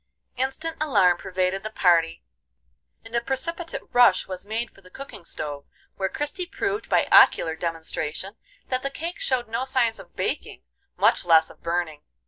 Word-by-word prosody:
Instant 270 +6 -2
alarm 200 - +4
pervaded 185 0 -1
the 215 - -5
party, 170 - +2 0.8
and 225 - -13
a 235 - +1
precipitate 325 +7 -3
rush 240 -6 +5
was 185 +1 -6
made 225 +2 -2
for 195 - -20
the 185 - -17
cooking 265 -5 -10
stove, 145 -3 -6 0.3
where 190 0 -1
Christie 295 - -3
proved 400 +3 -3
by - - +3
ocular 160 -1 +6
demonstration 165 +3 -4 0.3
that 255 -1 0
the 275 - -2
cake 330 +5 -6
showed 255 -2 -1
no 230 +3 -2
signs 255 -4 +1
of - - -14
baking, - - -3 0.3
much - - +3
less 160 -2 +5
of - - -19
burning. 170 -3 -2
215 Hz, 160 wpm, -25 LUFS, 175-265 Hz, 0.8 s, ocular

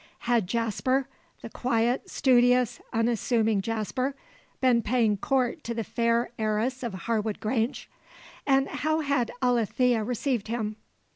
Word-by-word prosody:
Had 235 -5 +2
Jasper 235 +5 0 0.4
the - - -6
quiet, 240 0 0
studious 250 -1 +3
unassuming 225 -2 +1
Jasper 230 +6 -2 0.4
been 250 -3 +3
paying 220 -1 +2
court 260 - 0
to 235 - -3
the 225 - -2
fair 230 +2 0
heiress 220 +4 0
of 235 -6 -4
Harwood 220 -2 -1
Grange? 225 +3 -1 0.6
And 270 -1 +3
how 310 +1 -1
had 275 -5 0
Alethea 245 -1 +2
received 245 0 -1
him? 215 -2 -3
235 Hz, 125 wpm, -27 LUFS, 225-255 Hz, 0.6 s, studious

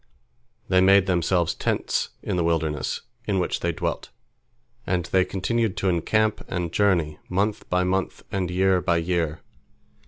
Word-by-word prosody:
They 90 0 +4
made 95 0 +6
themselves 90 -2 +1
tents - - -1
in - - -2
the 90 - +1
wilderness 80 -4 -1 0.3
in 100 -2 +1
which 90 - -1
they - - 0
dwelt, - - -3 0.8
and 90 -2 0
they 95 +1 +3
continued 105 +3 -1
to 100 -2 +1
encamp 110 +5 +1
and 90 -2 -3
journey, 85 -7 +1
month 100 +4 -1
by 90 0 +2
month 95 +1 -1
and 95 -3 -1
year 95 0 +2
by 85 -1 +2
year. 85 0 -1
90 Hz, 150 wpm, -24 LUFS, 85-95 Hz, 0.8 s, made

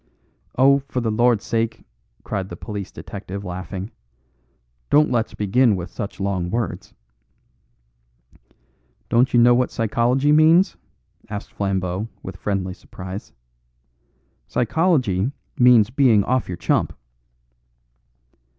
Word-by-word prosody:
"Oh, 140 +2 +5
for 130 - -2
the 115 -2 -1
Lord's 120 0 +2
sake," 115 0 -2 0.4
cried 95 -1 -4
the 85 - -7
police 100 0 -6
detective 100 0 -8
laughing, 95 +3 -6 1.0
"don't 150 +1 +4
let's 115 -3 -1
begin 105 +2 +3
with 90 -1 -6
such 100 - -6
long 95 -3 -1
words." 115 -1 -4 2.1
"Don't 125 +3 +3
you 120 - +4
know 120 +1 +6
what 125 +1 +2
psychology 120 +5 +1
means?" 160 +5 +5 0.5
asked 105 0 -7
Flambeau 95 0 -2 0.2
with 95 - -7
friendly 95 -2 -2
surprise. 95 -1 -9 1.2
"Psychology 125 - +1 0.3
means 120 -3 +6
being 120 -6 +4
off 130 +3 0
your 90 - -5
chump." 85 - 0
110 Hz, 110 wpm, -22 LUFS, 95-125 Hz, 2.1 s, know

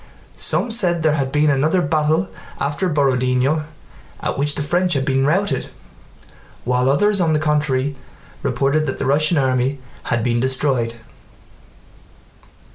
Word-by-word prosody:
Some 240 - 0
said 175 -7 +1
there 155 - +3
had 135 -3 -1
been 150 0 +3
another 155 +6 +2
battle 155 +4 +1 0.3
after 145 +6 -1
Borodinó 135 0 +1 0.5
at - - -3
which 145 +1 -1
the 145 - -2
French 175 +4 +1
had 135 -2 -1
been 135 -1 +1
routed, 195 +6 0 1.0
while 125 +1 +1
others 200 +8 +3
on 165 -2 +2
the 155 - +2
contrary 145 -3 0 0.5
reported 140 +4 0
that 130 - -3
the - - -3
Russian 155 +4 +2
army 130 0 +1 0.3
had 120 -2 0
been 120 0 +1
destroyed. 130 -2 0
145 Hz, 135 wpm, -19 LUFS, 130-155 Hz, 1.0 s, there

